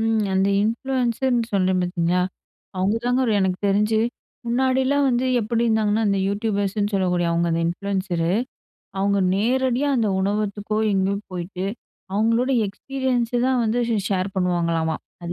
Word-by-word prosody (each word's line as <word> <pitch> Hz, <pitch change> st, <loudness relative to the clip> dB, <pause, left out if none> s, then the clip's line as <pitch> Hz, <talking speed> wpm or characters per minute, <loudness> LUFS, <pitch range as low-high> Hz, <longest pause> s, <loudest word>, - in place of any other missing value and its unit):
ம், 225 Hz, -1 st, +1 dB
அந்த 190 Hz, +1 st, +2 dB
இன்ஃப்ளூயன்ஸர்ன்னு 240 Hz, 0 st, 0 dB
சொல்றேன் 185 Hz, -2 st, +2 dB
பார்த்தீங்களா? 180 Hz, 0 st, 0 dB, 0.6 s
அவுங்க 195 Hz, +4 st, +1 dB
தாங்க 250 Hz, +1 st, +2 dB
எனக்கு 190 Hz, -1 st, 0 dB
தெரிஞ்சு, 210 Hz, +2 st, +2 dB, 0.5 s
முன்னாடிலாம் 265 Hz, +3 st, +2 dB
வந்து 245 Hz, +1 st, +1 dB, 0.2 s
எப்டி 230 Hz, +2 st, 0 dB
இருந்தாங்கன்னா, 220 Hz, -1 st, +2 dB
அந்த 200 Hz, -, +1 dB
யூடியூபர்ஸ்ன்னு 205 Hz, 0 st, -1 dB
சொல்லக்கூடிய 180 Hz, -3 st, +1 dB
அவுங்க 170 Hz, 0 st, +1 dB
அந்த 165 Hz, -, 0 dB
இன்ஃப்ளுயன்சரு. 180 Hz, -2 st, -1 dB, 0.7 s
அவுங்க 200 Hz, +1 st, +2 dB, 0.2 s
நேரடியா, 255 Hz, +5 st, +1 dB
அந்த 220 Hz, -3 st, +1 dB
உணவகத்துக்கோ 205 Hz, +1 st, -1 dB
எங்கேயோ 195 Hz, 0 st, +1 dB, 0.2 s
போயிட்டு, 180 Hz, +1 st, -5 dB, 0.5 s
அவுங்களோட 230 Hz, +5 st, +2 dB, 0.2 s
எக்ஸ்பீரியன்ஸ்ஸ 245 Hz, +3 st, -2 dB
தான் 260 Hz, -2 st, +2 dB
வந்து 225 Hz, +2 st, 0 dB
ச -, -, +2 dB, 0.2 s
ஷேர் 190 Hz, 0 st, -1 dB
பண்ணுவாங்களாம்மா. 170 Hz, -3 st, 0 dB, 0.3 s
அது 170 Hz, -, -3 dB
205 Hz, 130 wpm, -22 LUFS, 185-235 Hz, 0.7 s, அந்த